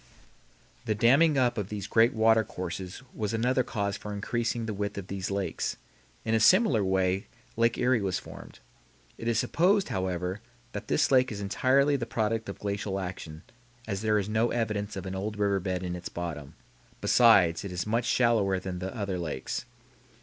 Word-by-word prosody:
The 110 - 0
damming 140 +8 +4
up 120 -3 +2
of 100 -1 -4
these 105 -2 -5
great 115 +3 +4
water 110 0 +4
courses 95 +3 -6
was 110 0 -2
another 125 +3 +2
cause 100 -4 -2
for 105 - -7
increasing 115 +3 -2
the 110 - -3
width 100 0 -3
of 100 -2 -6
these 95 -1 -3
lakes. 100 -4 -2 0.5
In 110 - 0
a 110 - +4
similar 135 - +5
way 95 +1 0 0.3
Lake 115 +1 +2
Erie 125 -2 +2
was 95 -2 -1
formed. - - -11 0.6
It 115 - -5
is 115 -2 +1
supposed, 190 - +2
however, 95 +1 -2 0.3
that - - -6
this - - +2
lake 130 -2 +4
is 105 - -5
entirely 130 +8 +2
the 120 -3 -4
product 115 -1 -1
of 100 - -6
glacial 100 -1 -3
action, 90 -3 -7 0.4
as 100 -2 -3
there 110 -1 +2
is 100 -1 -1
no 110 +2 +1
evidence 105 -3 -2
of 95 -1 -6
an 95 - -4
old 105 +2 -4
river 100 -1 +1
bed 90 -1 -3
in 90 -1 -3
its 90 - -6
bottom; 80 -5 -6 0.4
besides, 95 -9 +5
it 100 - -6
is 90 0 -3
much 115 +2 0
shallower 115 -7 +2
than 95 -1 -5
the 95 +7 -5
other 100 -4 -2
lakes. 80 -6 -4
105 Hz, 185 wpm, -28 LUFS, 95-115 Hz, 0.6 s, similar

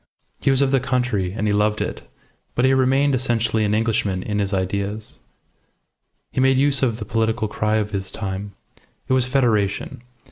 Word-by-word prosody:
He - - +1
was 135 0 +4
of 135 - +1
the 135 - +3
country, 125 -8 -1
and 105 0 -2
he 105 - +1
loved 105 +1 +1
it, - - -3 0.5
but 125 - +2
he 130 - +4
remained 135 +2 +3
essentially 115 -3 +1
an 105 0 +1
Englishman 105 -4 0
in 105 -1 -2
his 100 -1 -1
ideas. 100 +2 -3 1.1
He - - 0
made 130 0 +4
use 140 0 +3
of 120 -4 +1
the 110 - -6
political 110 0 0
cry 105 +1 -1
of 105 -1 -1
his 95 -2 -3
time. 100 0 -5 0.5
It - - +1
was 130 -1 +3
Federation. 115 -7 0
110 Hz, 180 wpm, -21 LUFS, 105-130 Hz, 1.1 s, was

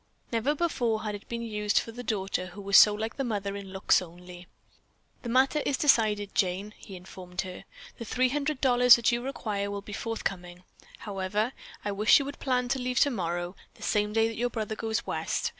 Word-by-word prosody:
Never 235 +6 +1
before 245 -9 0
had 210 -1 -3
it 205 - -9
been 235 0 -4
used 210 -2 -1
for 230 - +1
the 245 +2 -8
daughter 195 -5 -2
who 185 +3 -10
was 200 0 +1
so 210 - +9
like 220 +1 -4
the 275 - -1
mother 200 -4 -2
in 200 -1 -8
looks 190 0 +3
only. 180 0 -11 0.7
"The 240 - -6
matter 265 +5 +3
is 275 - 0
decided. 215 -8 +2
Jane," 195 +3 -1
he 195 - -11
informed 180 0 -7
her. 185 -1 -8 0.3
"The 230 - -5
$300 255 -1 +4
that 235 0 +2
you 240 0 0
require 215 -6 -3
will 200 0 -5
be 205 - -9
forthcoming. 180 -5 -4 0.3
However, 205 +3 -2 0.3
I 205 - 0
wish 210 +2 +5
you 280 - -1
would 285 +1 -7
plan 250 -2 0
to 270 +1 0
leave 250 0 0
tomorrow, 175 -8 0 0.2
the - - -13
same 210 -1 +1
day 225 +1 +3
that 225 - -6
your 245 +2 0
brother 220 -2 -4
goes 220 0 -2
West. - - -2
215 Hz, 195 wpm, -28 LUFS, 195-245 Hz, 0.7 s, so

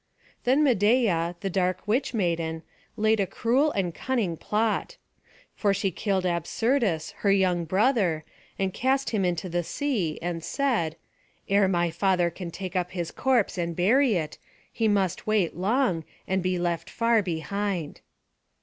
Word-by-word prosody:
Then 265 +5 +4
Medeia, 205 - +2
the 195 - -2
dark 185 +2 -1
witch 250 +6 +1
maiden, 170 -6 -1 0.3
laid 220 0 +3
a 195 - +1
cruel 260 - +1
and 195 -4 0
a - - -7
cunning 220 -4 -1
plot; 220 - -1 0.6
for 200 -2 +1
she 195 0 0
killed 190 0 -1
Absyrtus 180 - 0
her 200 - +2
young 185 -3 +2
brother, 185 - +1 0.3
and 190 -1 -1
cast 265 +2 0
him 210 -4 +1
into 180 +1 -1
the 175 0 -1
sea, 205 - -1
and 170 -1 -4
said: 230 - 0 0.5
"Ere 200 0 +4
my 175 -2 +1
father 180 0 +1
can 175 +1 -7
take 185 +2 -6
up 180 0 -1
his 175 -3 -3
corpse 245 -8 +1
and 170 -1 -2
bury 230 - +3
it, 155 -3 -3 0.3
he 225 -1 +1
must 195 -3 0
wait 210 -6 +1
long, 190 - +1 0.2
and 190 0 0
be 185 0 0
left 175 -1 -2
far 230 -1 +2
behind." 185 -1 -3
190 Hz, 155 wpm, -26 LUFS, 175-225 Hz, 0.6 s, Then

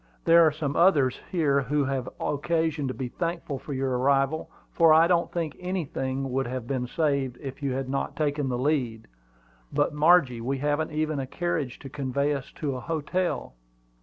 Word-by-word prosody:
"There 170 0 +7
are 155 - +5
some 150 -2 -3
others 150 -8 +4
here 145 -6 +2
who 145 +3 0
will - - +1
have 135 -2 -2
occasion 160 -1 0
to 130 - -2
be 130 - -3
thankful 165 -3 -3
for 145 - -9
your 130 -2 -1
arrival; 135 +3 +1 0.2
for 165 -2 +6
I 160 +1 +7
don't 170 -1 +2
think 165 -4 -3
anything 135 -7 -3
would 135 0 0
have 125 -1 -4
been 125 -1 -2
saved 140 -4 0
if 135 -1 -7
you 140 -2 -1
had 135 0 -3
not 135 +1 -2
taken 145 -2 0
the 125 - -1
lead. 125 -5 -1 0.6
But, - - +1
Margie, 150 -6 +4
we 135 +4 -1
haven't 145 +3 0
even 155 -1 -1
a 135 - -3
carriage 155 -5 -2
to 140 - -8
convey 140 +1 -1
us 135 -2 -5
to 140 -4 -3
a - - -4
hotel." 165 - -2
140 Hz, 190 wpm, -26 LUFS, 130-160 Hz, 0.6 s, There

